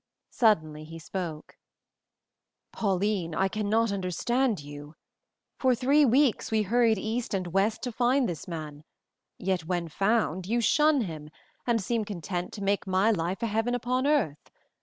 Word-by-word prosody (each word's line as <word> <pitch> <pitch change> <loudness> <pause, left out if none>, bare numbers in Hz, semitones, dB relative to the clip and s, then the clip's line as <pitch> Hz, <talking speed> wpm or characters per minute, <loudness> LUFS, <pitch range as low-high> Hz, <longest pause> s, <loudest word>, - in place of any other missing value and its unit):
Suddenly 155 -10 +2
he 165 +1 -9
spoke: 165 -2 -6 1.2
"Pauline, 195 -4 0
I 190 - +2
cannot 215 +2 0
understand 205 +5 0
you! 145 +1 -10 0.6
For 255 -2 +3
three 275 +5 +4
weeks 265 0 +2
we 220 -1 +2
hurried 225 +1 +3
east 220 +2 -2
and 185 -1 -2
west 195 +5 0
to 250 - -2
find 250 +3 +2
this 170 -5 -5
man, 155 -3 -7 0.5
yet 185 -3 -1
when 175 -1 -2
found 195 -1 0
you 235 +3 +1
shun 295 +4 +3
him 155 -7 -6 0.4
and 235 -1 +2
seem 230 +2 -1
content 180 -3 -4
to 200 - -6
make 200 0 0
my 190 +4 +3
life 185 +3 -2
a - - +3
heaven 225 +3 0
upon 255 +3 0
earth. 235 - 0
205 Hz, 150 wpm, -28 LUFS, 175-235 Hz, 1.2 s, three